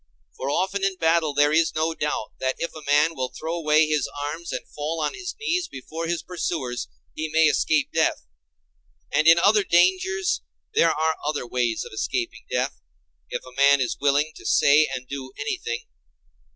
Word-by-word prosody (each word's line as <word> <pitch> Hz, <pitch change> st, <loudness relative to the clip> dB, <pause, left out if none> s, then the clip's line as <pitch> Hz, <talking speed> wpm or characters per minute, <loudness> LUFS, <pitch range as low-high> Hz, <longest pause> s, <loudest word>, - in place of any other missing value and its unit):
For 135 Hz, -, -4 dB
often 190 Hz, +6 st, 0 dB
in 195 Hz, -1 st, +1 dB
battle 165 Hz, -3 st, +1 dB
there 145 Hz, +1 st, +4 dB
is 160 Hz, 0 st, +2 dB
no 160 Hz, +1 st, 0 dB
doubt 150 Hz, -8 st, -3 dB
that 130 Hz, 0 st, 0 dB
if 170 Hz, -, -3 dB
a 155 Hz, -, -9 dB
man 150 Hz, +3 st, +4 dB
will 130 Hz, -1 st, -2 dB
throw 160 Hz, +5 st, -5 dB
away 155 Hz, -2 st, +3 dB
his 150 Hz, -3 st, 0 dB
arms, 160 Hz, +4 st, -4 dB
and -, -, -5 dB
fall 155 Hz, +2 st, -4 dB
on -, -, -1 dB
his 385 Hz, -2 st, -6 dB
knees 360 Hz, -5 st, 0 dB
before 160 Hz, +5 st, -6 dB
his 170 Hz, 0 st, -2 dB
pursuers, 155 Hz, -, -3 dB, 0.3 s
he 155 Hz, -, -3 dB
may 160 Hz, +1 st, +4 dB
escape 155 Hz, -1 st, +2 dB
death; -, -, +1 dB, 0.9 s
and 155 Hz, +1 st, +2 dB
in 165 Hz, +1 st, +8 dB
other 205 Hz, +4 st, +4 dB
dangers 185 Hz, -, +2 dB, 0.3 s
there 165 Hz, -, +4 dB
are 160 Hz, 0 st, 0 dB
other 145 Hz, -3 st, -2 dB
ways 120 Hz, -2 st, -1 dB
of -, -, -11 dB
escaping 115 Hz, +2 st, -3 dB
death, -, -, -2 dB, 0.5 s
if -, -, -4 dB
a 130 Hz, -, -12 dB
man 140 Hz, +1 st, +5 dB
is 125 Hz, -3 st, -1 dB
willing 145 Hz, +2 st, +2 dB
to -, -, -13 dB
say 150 Hz, +2 st, +4 dB
and 125 Hz, 0 st, -5 dB
do 130 Hz, -1 st, -7 dB
anything. 120 Hz, -4 st, -3 dB
155 Hz, 180 wpm, -24 LUFS, 140-170 Hz, 0.9 s, in